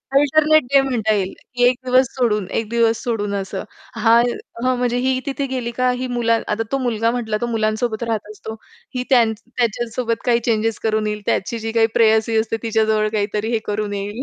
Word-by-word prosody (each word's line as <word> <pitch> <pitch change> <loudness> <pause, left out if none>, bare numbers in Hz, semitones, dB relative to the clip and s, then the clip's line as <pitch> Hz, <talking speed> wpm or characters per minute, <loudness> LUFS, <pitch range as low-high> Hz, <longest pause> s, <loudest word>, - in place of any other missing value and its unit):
Alternate 310 +2 +4
day 275 - +7
म्हणता 230 -5 0
येईल 195 -2 -1 0.2
की 245 - +1
एक 245 +1 +5
दिवस 255 +1 +4
सोडून 215 -6 +1
एक 220 - -5
दिवस 230 -1 +2
सोडून 210 -4 -2
असं. 195 -1 -4 0.3
हा 230 +1 +5 0.4
हां, 255 0 +2
म्हणजे 245 0 0
ही 255 +1 +1
तिथे 275 0 -2
गेली 250 -3 -3
का 255 +1 +1
ही 255 - -2
मुला 235 -2 +1
आता 215 +2 -1
तो 275 - +1
मुलगा 230 -3 0
म्हटला 225 -3 -2
तो 240 - 0
मुलांसोबत 220 0 -1
राहत 220 -2 -3
असतो. 220 +1 -8 0.4
ही 250 - -1
त्यां 245 -3 +6 0.2
त्याच्यासोबत 235 -1 -2
काही 235 -1 +3
चेन्जेस 225 -1 0
करून 215 -1 +1
येईल, 210 0 -3
त्याची 230 +4 -1
जी 225 0 -4
काही 225 -1 +3
प्रेयसी 220 0 +3
असते 225 0 0
तिच्याजवळ 220 -1 +1
काहीतरी 210 +1 -1
हे 225 - +1
करून 210 0 -2
येईल. 205 +5 -4
230 Hz, 195 wpm, -20 LUFS, 215-245 Hz, 0.4 s, day